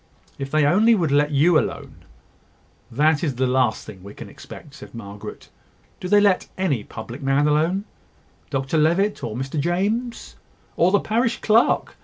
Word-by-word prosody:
If 135 0 -4
they 155 0 +2
only 215 +10 +4
would 165 -8 0
let 145 +1 +3
you 155 +3 +4
alone - - -5 0.5
" - - -35
"That 155 0 +3
is 145 -6 -1
the 130 +2 0
last 125 -3 0
thing 100 -4 -11
we 100 +2 -12
can - - -10
expect," 145 - -12
said 140 -4 -12
Margaret. 100 -3 -9 0.5
"Do 180 - -5
they 205 +2 +5
let 200 -3 +2
any 145 - -1
public 120 +6 -9
man 135 +2 +2
alone? 165 +7 +1 0.6
Dr 135 +3 -1
Levitt, 170 +4 +1
or 110 -3 -4
Mr 135 +4 -4
James?" 205 - -2 0.4
"Or 175 - +3
the 205 - +4
parish 235 +2 -1
clerk?" 225 +2 +2
150 Hz, 170 wpm, -22 LUFS, 135-190 Hz, 0.6 s, they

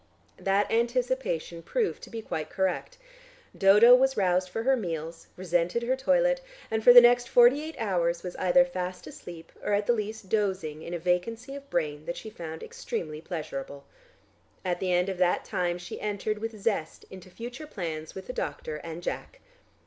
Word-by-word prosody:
That 195 +1 +1
anticipation 235 -8 -1
proved 445 - -1
to - - -10
be 225 -1 -6
quite 155 -5 -4
correct. 190 - -2 0.6
Dodo 210 +5 +7
was 265 +1 +4
roused 185 -2 +2
for 225 +5 -3
her 265 +2 +4
meals, 165 -6 -5
resented 175 +4 0
her 255 +2 +1
toilet, - - +2 0.3
and 220 0 0
for 245 - +9
the 245 0 +11
next 245 0 +4
forty 245 +4 +6
eight 315 +1 -7
hours 175 -5 0
was 180 -1 -6
either 225 +9 +4
fast 185 -8 -5
asleep 165 -2 -10
or - - 0
at 205 +1 +1
the 240 - +3
least 215 -2 -4
dozing 185 -7 -1
in 170 +2 -5
a - - -1
vacancy 180 - -1
of 280 0 -10
brain 150 -2 -2
that 170 - -3
she 220 - -8
found 160 -5 -7
extremely 155 -2 -5
pleasurable. 140 -5 -6 0.8
At 175 -1 -1
the 185 -1 -1
end 180 +1 +2
of 190 -2 -4
that 180 -1 +2
time 175 -1 -1
she 175 - -8
entered 210 0 -2
with 225 0 -5
zest 195 -7 -2
into 185 -1 -11
future 240 - -8
plans 160 - -5
with 190 -1 -7
the 250 - -6
doctor 150 -3 -4
and 165 +2 -8
Jack. - - -5
190 Hz, 180 wpm, -28 LUFS, 170-235 Hz, 0.8 s, the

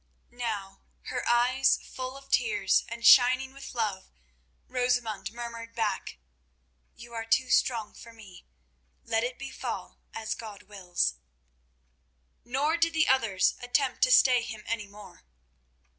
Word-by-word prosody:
Now, 200 -5 -4 0.3
her 250 -1 -3
eyes 250 +3 +3
full 255 +1 -7
of 275 0 -16
tears 455 -4 +2
and 235 0 -6
shining 255 +2 +6
with 275 -1 -10
love, 205 -5 -2 0.6
Rosamund 245 -6 -1
murmured 230 -1 -8
back: 220 - -2 0.8
"You 235 0 -13
are 225 -1 -4
too 230 +3 +1
strong 230 -4 +1
for 230 - -13
me. 210 -5 -15 0.6
Let 225 -1 0
it 250 +1 -3
befall 275 0 -6
as 220 -1 -3
God 215 -3 -9
wills." 180 - -2 1.3
Nor 285 +7 0
did 330 0 +1
the 320 0 +3
others 230 -8 +3
attempt 250 +1 0
to - - +4
stay 255 - +6
him 220 -2 -7
any 225 -3 -3
more. 205 +1 -14
235 Hz, 130 wpm, -28 LUFS, 220-255 Hz, 1.3 s, shining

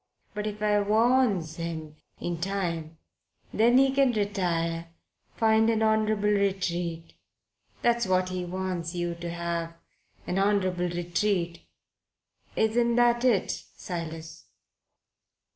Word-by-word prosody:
But 210 0 -3
if 210 0 -5
I 210 -1 +3
warns 210 -5 +2
him 160 -2 -5 0.2
in 175 -1 -3
time, 170 -4 -3 0.6
then 235 +3 +4
he 270 0 +5
can 270 -2 +4
retire 170 -5 -1 0.5
find 220 0 +3
an 220 -1 +2
honourable 215 -1 +2
retreat 175 -5 -1 0.7
that's 235 -3 +2
what 185 0 +2
he 185 -1 -3
wants 180 -1 -3
yer 175 0 -1
to 170 0 -6
have 170 -1 -3 0.5
an 180 - -1
honourable 185 -3 +1
retreat. 175 0 -1 0.9
Isn't 235 +2 +2
that 240 0 +3
it, 235 -7 +3
Silas?" 165 -2 -7
185 Hz, 110 wpm, -27 LUFS, 170-215 Hz, 0.9 s, he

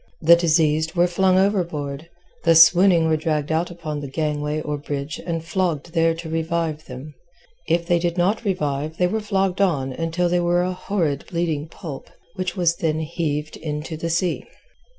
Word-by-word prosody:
The 170 +1 +8
diseased 160 -1 +2
were 175 0 +4
flung 185 +1 +2
overboard; 170 -6 -1 0.3
the 165 0 +5
swooning 170 +1 +6
were 160 - +3
dragged 155 -1 -1
out 165 +2 0
upon 160 -4 -5
the 140 -1 -6
gangway 150 +1 -2
or 150 -1 -3
bridge 145 +1 -5
and 165 -1 -3
flogged 170 -3 -2
there 165 -1 +2
to 165 0 -8
revive 160 -1 -2
them; 130 +4 -9 0.5
if 170 0 +1
they 175 0 +2
did 170 +1 -1
not 195 +6 +1
revive 155 -5 -2
they 180 - +2
were 220 +5 -1
flogged 195 -2 0
on 140 -9 +1
until 165 +4 -1
they 175 +1 +1
were 175 0 +2
a 185 0 -1
horrid 175 -6 -2
bleeding 165 -4 -2
pulp, 160 -3 -9 0.2
which 185 +1 -4
was 170 -2 +2
then 155 -1 0
heaved 155 -2 -3
into 155 +1 -5
the 165 +2 -4
sea. 175 +2 0
165 Hz, 175 wpm, -22 LUFS, 155-175 Hz, 0.5 s, The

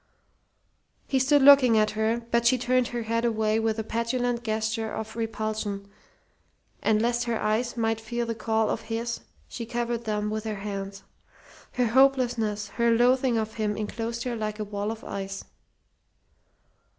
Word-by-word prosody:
He 265 - +1
stood 270 +2 +4
looking 265 -5 +8
at 215 0 +3
her, 220 +2 -1
but 235 0 +3
she 255 - +4
turned 250 0 +1
her 240 -2 -4
head 230 +1 -1
away 220 -2 +1
with 225 0 0
a 220 - -2
petulant 235 +2 -1
gesture 220 0 -1
of 220 0 -5
repulsion; 215 -3 -3 0.9
and 215 -1 +3
lest 240 +1 +1
her 235 -2 -1
eyes 225 +3 0
might 225 -1 0
feel 235 +2 -3
the 230 - -2
call 220 -1 0
of - - -2
his 230 +1 -2 0.3
she 230 -2 -6
covered 235 -1 -2
them 210 -1 -1
with 215 0 -3
her 215 -1 -2
hands. 195 -1 -6 0.7
Her 250 - +1
hopelessness, 235 -5 +2
her 235 +2 +1
loathing 245 +1 +3
of 220 0 -2
him 210 -1 -1
enclosed 230 +2 -3
her 245 -2 -2
like 215 -1 -3
a 215 - -3
wall 205 0 -3
of 225 0 -6
ice. 195 0 -5
225 Hz, 160 wpm, -26 LUFS, 215-240 Hz, 0.9 s, looking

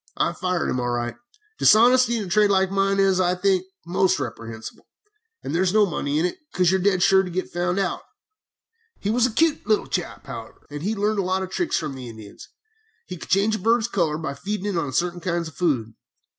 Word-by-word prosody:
I - - +1
fired 180 -2 -1
him, 130 - -1
all 120 0 -1
right. 120 0 -2 0.5
Dishonesty 240 +2 +5
in 215 - -2
a - - -8
trade 205 +3 +3
like 190 -1 +2
mine 195 0 +1
is, 195 -1 +3
I 180 0 +2
think, 185 0 +1 0.2
most 185 +1 +1
reprehensible, 115 -3 -7 0.6
and - - -4
there 170 - +1
is 190 +2 +1
no 215 -1 +6
money 150 -5 -2
in 160 - +2
it, 180 - -3
because 180 -1 +2
you 190 - +2
are - - -4
dead 185 -2 +2
sure 190 0 +5
to 185 - -5
get 185 +2 -4
found 175 +1 -1
out. 195 -3 -1 1.0
"He 205 - -1
was 245 +2 +3
a - - -5
cute 315 +6 +1
little 215 -2 +2
chap, - - -4
however, - - -9
and 145 0 -6
had 210 +5 -2
learned 210 +1 0
a - - +3
lot 185 +1 -1
of 190 - -7
tricks 350 - 0
from 155 -3 -3
the 130 -2 -8
Indians. 110 -2 -12 0.6
He 180 - -7
could 165 - -11
change 205 +3 +2
a - - -10
bird's 230 +3 +2
color 170 -9 0
by 155 -3 -4
feeding 205 +6 -3
it - - -3
on 150 -5 -1
certain 175 +6 -1
kinds 170 -1 -2
of - - -17
food. 130 -11 0
185 Hz, 230 wpm, -23 LUFS, 165-205 Hz, 1.0 s, no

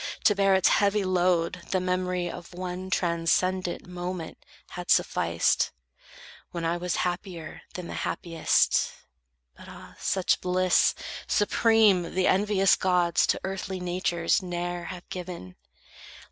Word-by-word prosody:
To 210 - +5
bear 195 -1 +3
its 190 - +4
heavy 205 0 +2
load, 180 -2 +1
the 185 - +1
memory 180 -1 -1
Of 175 0 -9
one 185 +1 -5
transcendent 175 +1 0
moment 180 -1 -6 0.3
had - - -8
sufficed, 85 0 +2 0.8
When 170 -1 -4
I 165 +1 +1
was 175 -1 -2
happier 175 -2 -5
than 180 - -5
the - - -7
happiest, 165 -3 +1 0.6
But, - - -14
ah, - - -12
such 190 -2 +1
bliss 185 0 +3 0.3
supreme 205 -5 +3
the 185 0 +2
envious 195 0 +3
gods 180 -2 +2
To - - 0
earthly 190 0 -4
natures 175 -1 0
ne'er 175 -1 -4
have 180 0 -8
given! 175 - -7
180 Hz, 125 wpm, -27 LUFS, 175-185 Hz, 0.8 s, To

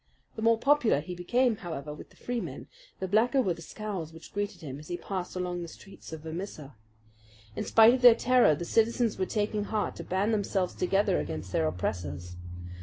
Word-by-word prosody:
The 220 - -5
more 230 0 +4
popular 260 - +3
he 160 +5 -6
became, 235 +6 +1
however, 155 -5 -6
with 150 - -11
the - - -22
Freemen, 245 -1 -4 0.3
the 190 - -2
blacker 225 +7 +3
were 190 -9 +2
the 165 - -11
scowls 190 -3 -5
which 165 0 -13
greeted 205 0 -3
him 140 -3 -6
as 150 - -12
he 175 - -3
passed 185 -2 -5
along 180 -1 -2
the 170 - -5
streets 195 +2 -13
of 160 -1 -6
Vermissa. 160 -3 -6 0.8
In - - -3
spite 225 +1 +7
of 255 - 0
their 245 -2 +9
terror 245 -10 +4
the 170 - -5
citizens 230 +2 +2
were 185 - 0
taking 210 -1 -1
heart 215 0 -1
to - - -6
band 195 +4 0
themselves 195 -3 0
together 195 +1 +2
against 80 +4 -5
their 80 - +2
oppressors. 90 0 -3
190 Hz, 195 wpm, -29 LUFS, 160-220 Hz, 0.8 s, their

